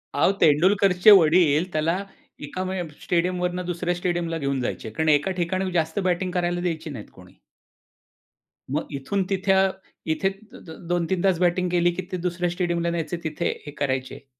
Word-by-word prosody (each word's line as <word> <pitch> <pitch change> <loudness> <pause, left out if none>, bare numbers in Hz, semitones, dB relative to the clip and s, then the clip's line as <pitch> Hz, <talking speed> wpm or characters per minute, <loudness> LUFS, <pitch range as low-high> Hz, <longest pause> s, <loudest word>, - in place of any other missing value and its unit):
अहो, - - +4
तेंडुलकरचे 185 +5 +5
वडील 170 -2 +5
त्याला 160 +3 +1 0.5
एका 185 +6 -4
म 185 - -3 0.3
स्टेडियमवरून 180 +1 0
2ऱ्या 175 0 -2
स्टेडियमला 175 -2 -2
घेऊन 140 -3 -1
जायचे. 115 -2 -4
कारण 155 +8 -1
एका 150 +5 +3
ठिकाणी 185 +2 -1
जास्त 165 +1 0
बॅटिंग 180 +1 -1
करायला 175 0 -1
द्यायचे 165 -3 -3
नाहीत 120 -8 -8
कोणी. - - -17 1.3
मग 150 +3 -2
इथून 190 +9 -1
तिथे 195 0 +1
अ 190 0 +4 0.4
इथे 190 +4 0 0.6
2-3 175 +1 0
तास 190 -3 +2
बॅटिंग 180 0 +1
केली, 175 0 +3
की 175 - -4
ते 185 - -2
2ऱ्या 175 0 -2
स्टेडियमला 170 -1 -1
न्यायचे 170 0 -3
तिथे 160 +2 -2 0.2
हे 145 - -7
करायचे. 130 0 -3
175 Hz, 155 wpm, -24 LUFS, 160-180 Hz, 1.3 s, तेंडुलकरचे